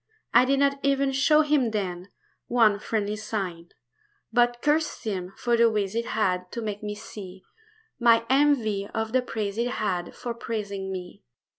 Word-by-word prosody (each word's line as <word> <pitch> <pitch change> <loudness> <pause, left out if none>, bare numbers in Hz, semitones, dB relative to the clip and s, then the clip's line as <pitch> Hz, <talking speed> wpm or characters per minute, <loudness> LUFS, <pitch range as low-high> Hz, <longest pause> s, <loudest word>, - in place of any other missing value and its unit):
I 250 - +7
did 275 +1 +2
not 280 0 +2
even 275 0 +2
show 300 +3 +4
him 290 -5 +2
then 190 -3 -3 0.4
One 220 -4 +4
friendly 210 -1 -2
sign; 195 -6 -4 0.6
But 240 0 +3
cursed 305 +1 +1
him 185 -4 -3
for 240 -1 +1
the 235 0 +5
ways 205 -3 -1
he 230 - +1
had 180 -6 -1
To 235 - -3
make 210 -1 -4
me 210 0 -4
see 195 -3 -10 0.6
My 230 -1 +5
envy 245 -8 +2
of 220 0 -1
the 255 +1 +3
praise 215 -4 -4
he 235 - +1
had 190 -8 -2
For 240 - -4
praising 200 -4 -4
me. 180 -1 -7
220 Hz, 165 wpm, -26 LUFS, 200-245 Hz, 0.6 s, I